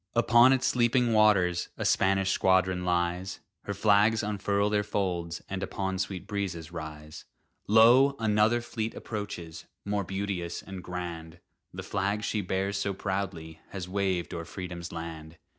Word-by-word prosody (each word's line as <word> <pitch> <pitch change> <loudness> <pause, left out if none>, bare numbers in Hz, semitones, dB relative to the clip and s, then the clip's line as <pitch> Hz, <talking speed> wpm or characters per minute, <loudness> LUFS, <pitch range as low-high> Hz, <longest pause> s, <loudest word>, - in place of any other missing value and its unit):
Upon 120 +2 +6
its 130 -1 +2
sleeping 120 0 +2
waters 100 -5 +3
A - - -3
Spanish 95 0 +2
squadron 95 -1 +2
lies; 90 +1 -1 0.3
Her 100 - -2
flags 105 +2 +3
unfurl 100 0 0
their 105 -1 +2
folds, 90 -5 -2
and 95 0 -4
Upon 95 -1 -3
sweet 95 -2 -3
breezes 95 -6 -4
rise. 75 -2 -8 0.4
Lo! 120 +6 +6
another 110 +1 +2
fleet 115 -1 -4
approaches, 100 -7 -6 0.2
More 100 0 -1
beauteous 95 -2 -4
and 95 -2 -8
grand; 85 -3 -6 0.3
The - - -7
flag 100 +1 -1
she 105 -1 -1
bears 95 +1 -1
so 100 -1 -2
proudly 90 -5 -4
Has 95 -2 -6
waved 95 -3 -1
o'er 85 - -4
Freedom's 90 0 -7
land! 80 -1 -7
95 Hz, 140 wpm, -28 LUFS, 90-105 Hz, 0.4 s, Upon